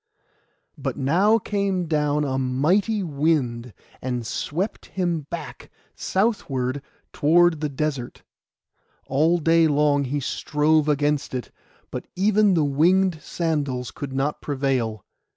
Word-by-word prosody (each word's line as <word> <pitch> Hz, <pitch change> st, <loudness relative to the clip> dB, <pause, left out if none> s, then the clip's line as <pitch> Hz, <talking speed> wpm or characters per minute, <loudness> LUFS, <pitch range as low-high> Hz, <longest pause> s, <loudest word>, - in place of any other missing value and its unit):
But -, -, -3 dB
now 185 Hz, +11 st, +3 dB
came 200 Hz, -4 st, -1 dB
down 150 Hz, -2 st, +1 dB
a 135 Hz, -2 st, -1 dB
mighty 175 Hz, -, +1 dB
wind, 140 Hz, -7 st, 0 dB, 0.3 s
and 125 Hz, -2 st, -3 dB
swept 180 Hz, -, -3 dB
him 170 Hz, -6 st, -2 dB
back -, -, -7 dB, 0.3 s
southward 145 Hz, -, -1 dB, 0.3 s
toward 165 Hz, +1 st, +3 dB
the 150 Hz, -, -1 dB
desert. 140 Hz, -3 st, -4 dB, 0.8 s
All 155 Hz, +6 st, +2 dB
day 165 Hz, 0 st, +4 dB
long 145 Hz, -1 st, +2 dB
he 140 Hz, +3 st, -2 dB
strove 150 Hz, +2 st, +1 dB
against 145 Hz, -1 st, 0 dB
it; 125 Hz, -4 st, -5 dB, 0.4 s
but -, -, -6 dB
even 205 Hz, 0 st, +3 dB
the 155 Hz, -3 st, +2 dB
winged 170 Hz, +4 st, +2 dB
sandals 145 Hz, -7 st, -2 dB
could 140 Hz, -2 st, -6 dB
not 135 Hz, +3 st, -2 dB
prevail. 130 Hz, -7 st, -1 dB
150 Hz, 115 wpm, -23 LUFS, 135-175 Hz, 0.8 s, day